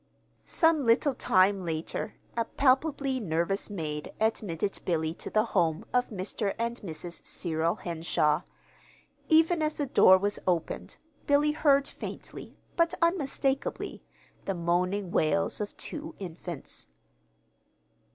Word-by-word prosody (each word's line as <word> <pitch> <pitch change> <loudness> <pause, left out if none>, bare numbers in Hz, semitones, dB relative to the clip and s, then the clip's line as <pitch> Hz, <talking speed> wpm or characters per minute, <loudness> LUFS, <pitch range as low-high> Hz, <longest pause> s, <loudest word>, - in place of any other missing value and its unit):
Some 325 -3 +3
little 245 +5 +4
time 190 -4 +3
later, 165 +5 -4 0.2
a 230 - +1
palpably 275 0 +1
nervous 175 0 -1
maid 155 -6 -4
admitted 205 -4 -1
Billy 160 -2 0
to - - -7
the 215 - +3
home 165 -4 +1
of 250 0 +2
Mr. 200 0 -3
and 235 +1 -2
Mrs. 170 -1 -6
Cyril 165 -1 -1
Henshaw. 160 -3 0 0.9
Even 325 +1 +5
as 305 0 0
the 290 - -1
door 190 -7 +7
was 205 +2 -1
opened, 175 -3 -1 0.3
Billy 290 +1 +4
heard 285 -2 +3
faintly, - - -8 0.2
but 335 +1 +2
unmistakably, 280 -5 0 0.4
the 195 - -1
moaning 180 +3 0
wails 195 +7 +1
of 205 - -5
two 315 +1 -5
infants. 175 -4 -6
205 Hz, 120 wpm, -29 LUFS, 170-275 Hz, 0.9 s, door